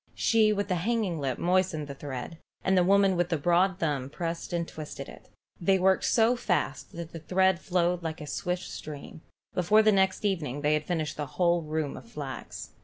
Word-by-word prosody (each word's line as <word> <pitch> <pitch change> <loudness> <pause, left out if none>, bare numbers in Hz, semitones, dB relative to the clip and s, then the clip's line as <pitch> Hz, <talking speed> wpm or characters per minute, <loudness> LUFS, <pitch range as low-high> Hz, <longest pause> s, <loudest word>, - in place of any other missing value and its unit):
She 220 -2 +3
with 205 -1 -1
the 185 -3 0
hanging 210 -5 0
lip 135 -3 -2
moistened 180 -3 +1
the 140 - -7
thread, 140 +3 -7 0.2
and 190 - +2
the 180 - +5
woman 195 0 +4
with 175 0 0
the 165 - +1
broad 175 +4 +2
thumb 145 -7 -1
pressed 165 +3 -4
and 170 -1 -1
twisted 150 -3 -7
it. - - -13 0.3
They 190 +2 +3
worked 190 +1 +3
so 230 +1 +4
fast 175 - -1
that 170 -1 -7
the 165 - -7
thread 190 +2 +2
flowed 180 -1 +1
on - - -18
like 160 0 -4
a 150 - -7
swift 180 +4 -2
stream. 150 0 -8 0.3
Before 210 +5 +4
the 215 - +5
next 190 0 +2
evening 150 -9 -1
they 150 +1 +2
had 150 0 -1
finished 155 -3 -2
the 150 -1 -3
whole 175 -1 +3
roomful 155 -2 -3
of - - -17
flax. 140 - -7
175 Hz, 205 wpm, -28 LUFS, 150-190 Hz, 0.3 s, the